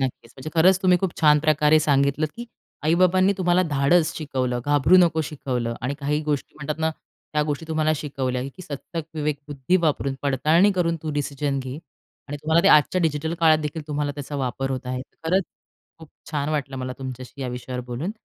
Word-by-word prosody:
नक्कीच, 130 -3 -4
म्हणजे 135 +3 -7
खरंच 185 +3 +5
तुम्ही 180 -1 +4
खूप 190 -1 -1
छान 150 -1 +6
प्रकारे 155 0 +4
सांगितलं, 140 +1 +2
की 235 +1 -7 0.4
आई-बाबांनी 185 +4 +4
तुम्हाला 180 0 +3
धाडस 155 +4 +3
शिकवलं, 130 -5 -2
घाबरू 145 +4 +4
नको 165 -3 +4
शिकवलं 125 -5 -3
आणि 130 +3 -2
काही 150 +2 0
गोष्टी 150 -2 -3
म्हणतात 150 +1 -4
ना 160 0 +2 0.4
त्या 150 0 +2
गोष्टी 150 +1 -3
तुम्हाला 155 0 +1
शिकवल्या, 130 -3 -3
की 185 - -9
सत्सदविवेकबुद्धी 150 0 -3
वापरून 150 -5 0
पडताळणी 155 +8 +3
करून 170 -3 0
तू 155 - -3
डिसिजन 145 -1 -2
घे 130 +3 -6 0.5
आणि 145 - -4
तुम्हाला 160 +3 +3
ते 195 - +5
आजच्या 150 +3 +5
डिजिटल 160 0 -1
काळात 160 -1 +5
देखील 155 +1 -4
तुम्हाला 145 -1 -1
त्याचा 145 0 -6
वापर 135 0 -2
होत 130 -1 -4
आहे. 125 0 -3 0.2
खरंच 185 +3 +2 0.5
खूप 160 - -13 0.2
छान 145 -1 -1
वाटलं 140 -3 -2
मला 130 0 -4
तुमच्याशी 130 0 -8
या 130 - -3
विषयावर 125 +1 -5
बोलून. 125 +10 -3
150 Hz, 180 wpm, -23 LUFS, 135-160 Hz, 0.5 s, छान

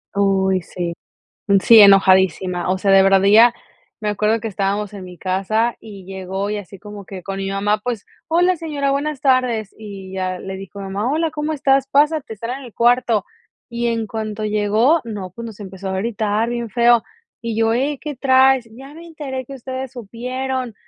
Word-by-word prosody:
Uy, 190 -1 +2
sí. 175 0 -5 0.7
Sí, 230 -2 +8
enojadísima. 190 -2 +4
O 190 - 0
sea, 195 +1 +2
de 195 0 +7
verdad 195 0 +4
ella 225 +4 +7 0.5
me 210 - -2
acuerdo 210 +2 +1
que 225 - -4
estábamos 200 +1 -2
en 195 -2 -8
mi 180 -1 -12
casa 215 +5 0
y 200 -4 -11
llegó 190 +1 -4
y 210 - -2
así 195 -1 -9
como 205 +1 -10
que 185 -1 -9
con 195 +2 -5
mi 195 0 -3
mamá, 205 +2 0
pues: 235 -3 -4 0.2
"Hola, 355 +3 +3
señora. 295 -4 -2
Buenas 285 0 -2
tardes". 250 -6 +1
Y 200 -3 -9
ya 185 -1 -3
le 190 +1 -6
dijo 195 +1 -10
mi 200 - -6
mamá: 200 +5 -2
"Hola, 320 +2 0
¿cómo 305 0 -2
estás? 270 -2 +2
Pásate, 295 -4 +1
están 230 +5 -5
en - - -11
el 235 - -14
cuarto". 235 -3 +2 0.4
Y 235 0 -3
en 230 -1 -1
cuanto 215 0 -4
llegó, 215 +9 +2
no, 205 -5 -6
pues, 230 +6 -8
nos 220 -2 -10
empezó 190 -1 -7
a 190 - -2
gritar 215 +1 -1
bien 235 -1 -4
feo. 235 0 +4 0.4
Y 230 -2 -3
yo: 225 0 +2
"Hey, 275 +4 0
¿qué 300 -1 -5
traes? 260 -2 +4
'Ya 270 +6 -12
me 335 +2 -11
enteré 280 -5 -6
que 275 - -10
ustedes 260 0 -6
supieron'". 250 +1 -4
220 Hz, 195 wpm, -19 LUFS, 195-260 Hz, 0.7 s, Sí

